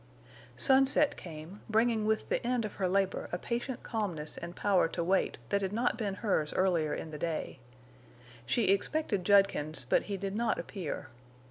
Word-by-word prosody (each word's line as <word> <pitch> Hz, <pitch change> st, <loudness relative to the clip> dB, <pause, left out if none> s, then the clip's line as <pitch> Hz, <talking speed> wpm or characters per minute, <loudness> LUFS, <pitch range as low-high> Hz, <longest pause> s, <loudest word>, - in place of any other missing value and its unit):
Sunset 270 Hz, +2 st, +5 dB
came, 165 Hz, +3 st, -9 dB
bringing 220 Hz, 0 st, +2 dB
with 220 Hz, 0 st, 0 dB
the -, -, -1 dB
end 240 Hz, -1 st, 0 dB
of 210 Hz, -, -5 dB
her 185 Hz, -, +2 dB
labor 195 Hz, 0 st, 0 dB
a 175 Hz, -, -1 dB
patient 240 Hz, +5 st, -4 dB
calmness 180 Hz, -10 st, -3 dB
and 170 Hz, +1 st, -7 dB
power 195 Hz, -4 st, +3 dB
to 170 Hz, +1 st, -3 dB
wait 190 Hz, +3 st, +1 dB
that 200 Hz, -, +1 dB
had 190 Hz, -1 st, -1 dB
not 235 Hz, +3 st, +1 dB
been 205 Hz, -4 st, -2 dB
hers 185 Hz, -9 st, 0 dB
earlier 175 Hz, -5 st, +2 dB
in 160 Hz, -, -6 dB
the 150 Hz, -, -7 dB
day. 165 Hz, -4 st, -3 dB, 0.9 s
She 215 Hz, -, +2 dB
expected 205 Hz, -, +1 dB
Judkins, 175 Hz, -8 st, +3 dB
but -, -, +3 dB
he 200 Hz, -, -2 dB
did 195 Hz, +1 st, -4 dB
not 230 Hz, 0 st, +1 dB
appear. 180 Hz, -8 st, -5 dB
195 Hz, 170 wpm, -31 LUFS, 170-225 Hz, 0.9 s, Sunset